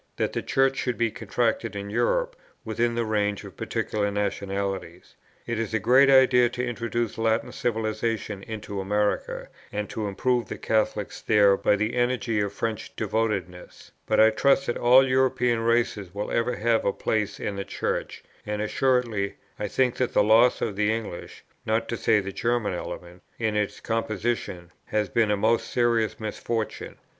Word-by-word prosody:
that - - -1
the - - -1
Church 135 0 +1
should 125 -4 -1
be 115 0 +1
contracted 115 -2 -1
in 100 0 -5
Europe - - +1 0.3
within 120 +1 0
the 120 -1 0
range 105 -2 0
of - - -11
particular 105 -1 -2
nationalities. 100 -3 -3 0.3
It 115 -1 -2
is 115 -1 -2
a - - +2
great 130 +6 +5
idea 130 -2 +6
to 125 +1 -3
introduce 120 -1 -3
Latin 115 0 +1
civilization 110 -2 -2
into 100 -2 -5
America, 105 +1 -1 0.2
and 105 0 -3
to 110 -2 -3
improve 120 +4 0
the - - -6
Catholics 110 -3 -1
there 100 -2 +5
by 105 - +2
the 110 +3 -1
energy 120 -2 0
of 100 -1 -1
French 110 +1 -4
devotedness; 100 -5 -3 0.2
but - - +2
I 110 0 +7
trust 135 +4 +3
that 120 - -1
all 130 +2 +5
European 125 -2 +2
races 115 -5 0
will 105 +1 -3
ever 120 +1 0
have 115 +1 +1
a 100 - +2
place 105 0 -2
in 105 - -3
the 100 - -3
Church, - - -3 0.2
and 105 0 -3
assuredly 115 -2 0 0.2
I 105 - -2
think 125 +4 +1
that 125 - -1
the - - +4
loss 115 +4 +5
of 105 -4 -2
the 105 +1 +2
English, 110 -6 -6 0.2
not 110 +1 0
to - - -1
say 110 -1 +3
the 100 -1 -4
German 120 -3 0
element, 90 0 -7 0.2
in 110 -2 -1
its 105 -1 -1
composition 110 -5 -2
has 105 -2 -1
been 115 0 +2
a 105 - +2
most 110 +3 +1
serious 115 -2 +1
misfortune. 110 0 -4
110 Hz, 170 wpm, -25 LUFS, 105-120 Hz, 0.3 s, I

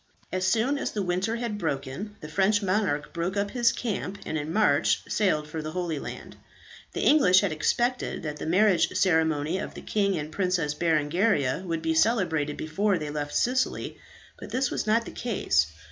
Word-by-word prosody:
As 185 0 0
soon 240 +8 +2
as - - -2
the 205 - -1
winter 185 +5 -1
had 230 -3 -3
broken, 155 +6 -4
the 150 - -7
French 200 +6 +2
monarch 185 -7 0
broke 175 +4 -2
up 200 0 -1
his 240 -1 +3
camp, 205 -4 -3
and - - -3
in 155 0 -3
March 165 -8 +2
sailed 155 -8 +1
for 160 +1 -5
the 155 +1 -6
Holy 175 -4 -2
Land. - - -8 0.6
The - - -3
English 190 -12 +6
had 200 -4 0
expected 240 +12 0
that 150 -1 -4
the 150 - -5
marriage 185 0 +4
ceremony 160 -2 +2
of - - -6
the - - -8
king 200 -3 0
and 150 0 -5
Princess 180 -5 0
Berengaria 160 - +1
would 165 -1 -2
be 160 0 +1
celebrated 160 -6 +1
before 195 +5 0
they 150 -2 -4
left 145 -1 -4
Sicily, 255 +1 0 0.4
but - - -9
this 260 0 0
was - - -2
not 230 +2 +2
the - - -7
case. 75 - +1
180 Hz, 185 wpm, -27 LUFS, 155-210 Hz, 0.6 s, English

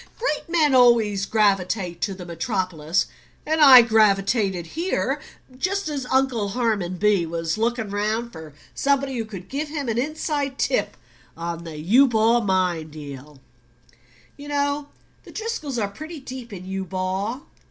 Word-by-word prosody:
Great 335 -10 -2
men 315 -5 +3
always 225 -6 +4
gravitate 195 -4 +1
to 195 -3 -1
the 180 -1 -9
metropolis. 170 -1 -1 0.4
And 315 +1 +1
I 260 -4 +10
gravitated 200 -4 +2
here 335 - -2 0.3
just 370 +5 -1
as 275 -4 -4
Uncle 260 -6 +1
Harmon 205 -6 -1
B. 205 -2 +3
was 165 0 -2
looking 225 -1 -1
round 215 +3 -1
for 160 -6 -11 0.2
somebody 275 -1 0
who 230 -2 -2
could 195 -5 -9
give 290 +3 -3
him 290 -3 -4
an 230 0 0
inside 290 -1 -2
tip 270 - 0 0.4
on 170 0 -5
the 160 -2 -7
Eubaw 230 - +4
mine 180 -5 0
deal 145 -2 -10 1.0
you 285 - -10
know 285 0 -1 0.3
the - - -13
Driscolls 430 - -4
are 210 -3 0
pretty 310 +10 -9
deep 260 -3 -9
in 185 -2 -8
Eubaw. 190 +5 -3
220 Hz, 140 wpm, -23 LUFS, 185-275 Hz, 1.0 s, I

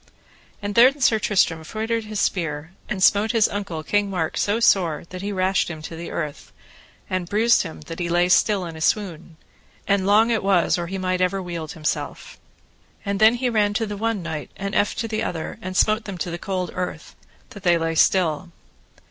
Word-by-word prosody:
And 205 0 -2
then 255 +6 +6
Sir 225 -4 +3
Tristram 180 -6 +1
feutred 220 +6 -3
his 215 -1 -4
spear, 160 -3 -1 0.2
and 190 -3 -1
smote 210 +5 +4
his 225 -3 +4
uncle, 195 -6 -4
King 205 +4 +1
Mark, 175 -5 -2
so 205 +3 +1
sore, 180 -9 +3
that 185 0 -6
he 200 +1 -3
rashed 190 0 +1
him 155 -2 -7
to 165 - -7
the 170 +1 -7
earth, 150 -3 -5 0.6
and 185 -2 -3
bruised 230 +3 +4
him 165 -3 -7
that 165 +3 -8
he 175 -1 -2
lay 175 +1 +3
still 190 +1 +3
in 165 -1 -7
a 160 - -9
swoon, 170 -4 -1 0.5
and 200 -1 +2
long 220 +3 +5
it 225 - +1
was 185 -3 +2
or 170 - -2
ever - - -8
he 195 +2 -4
might 185 -1 +1
wield 170 -3 -5
himself. 155 -2 -4 0.7
And 200 -1 -1
then 220 +2 +6
he 250 +1 -1
ran 210 -3 +1
to 225 - +1
the 205 -1 -5
one 220 -2 -2
knight, 160 -3 -5
and 200 +1 -5
eft 205 - +1
to 230 - -3
the 220 -1 -2
other, 170 -7 -4
and 185 +1 -4
smote 215 +2 +3
them 195 -3 -6
to 175 +1 -3
the 170 - -5
cold 185 -2 -3
earth, 180 0 -5 0.4
that 205 - -10
they 175 -2 +3
lay 165 0 -1
still. 175 0 +2
190 Hz, 205 wpm, -23 LUFS, 170-210 Hz, 0.7 s, then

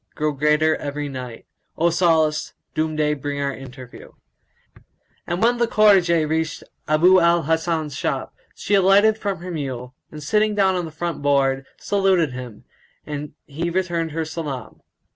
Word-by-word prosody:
grow 155 0 0
greater 150 +2 +2
every 145 0 -4
night: 125 -4 -8 0.2
* - - -46
O 170 +1 +2
solace! 160 -3 +2 0.2
Doom 155 0 -1
day 150 -1 +1
bring 145 0 -4
our 140 -1 -1
interview." 130 -2 -11 1.1
And 175 +4 -1
when 240 +1 +3
the 235 - +2
cortčge 185 -8 +4
reached 160 +2 -2 0.2
Abu 175 +5 +5
al 170 -1 +3
Hasan's 160 -1 -1
shop, - - -3 0.2
she 205 - -3
alighted 200 +3 +5
from 195 -5 -3
her 180 +1 -6
mule, 130 -5 -5 0.2
and 150 -1 -9
sitting 210 +6 +1
down 195 -2 +3
on 180 -2 -2
the 160 - -8
front 170 +1 -4
board,[FN#176] 135 -2 0
saluted 190 -6 +2
him, 125 -4 -9 0.4
and 150 -1 -6
he 165 +4 -3
returned 170 -2 -1
her 160 0 -2
salam. 150 -5 -6
160 Hz, 160 wpm, -22 LUFS, 145-180 Hz, 1.1 s, Abu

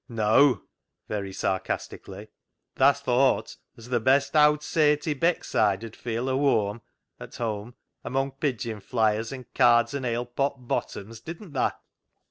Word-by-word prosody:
Neaw 115 - +4 0.2
" - - -56
(very 100 -2 -3
sarcastically); 95 0 -4 0.2
" - - -56
tha 135 +2 +6
thowt 130 +2 +1 0.2
'as 115 +1 -12
th' 120 -3 0
best 140 +3 +3
owd 150 0 +5
saint 150 -1 +2
i' 155 - +2
Beckside 115 - +1
'ud 115 - -10
feel 120 +1 -3
a 130 - 0
whoam 115 -6 +1 0.4
(at - - -10
home) 110 0 -4 0.3
among 135 +3 -1
pigeon 120 -6 -3
fliers 110 +1 0
an' 130 -2 -7
cards 120 -1 +4
an' 140 -2 -3
ale 120 0 -1
pot 130 +1 -3
bottoms, 110 +1 -4
didn't 170 +2 -9
tha? 130 - 0
125 Hz, 150 wpm, -26 LUFS, 110-140 Hz, 0.4 s, tha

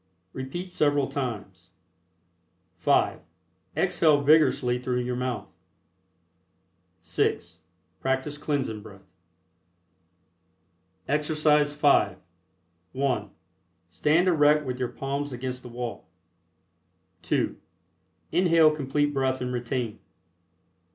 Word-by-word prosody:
Repeat 175 +8 -6
several 145 -4 +2
times. 100 -10 -6 1.0
(5) - - +2 0.6
Exhale 155 -3 +3
vigorously 140 -4 +4
through 125 0 -1
your 125 0 -2
mouth. 125 0 -4 1.5
(6) - - -1 0.4
Practice 135 +3 -1
Cleansing 135 -8 -2
Breath. 100 -2 -14 2.0
EXERCISE 150 0 +2
V. 140 -10 +4 0.8
(1) 135 -1 -1 0.6
Stand 150 - +2
erect 150 -3 +4
with 125 -1 -4
your 125 -2 -1
palms 140 +1 -4
against 125 0 -5
the 125 - -10
wall. 120 -4 -6 1.1
(2) - - 0 0.8
Inhale 165 -2 +5
Complete 145 0 -1
Breath 130 -1 0
and 125 0 -3
retain. 120 -2 -3
135 Hz, 85 wpm, -26 LUFS, 125-150 Hz, 2.0 s, Inhale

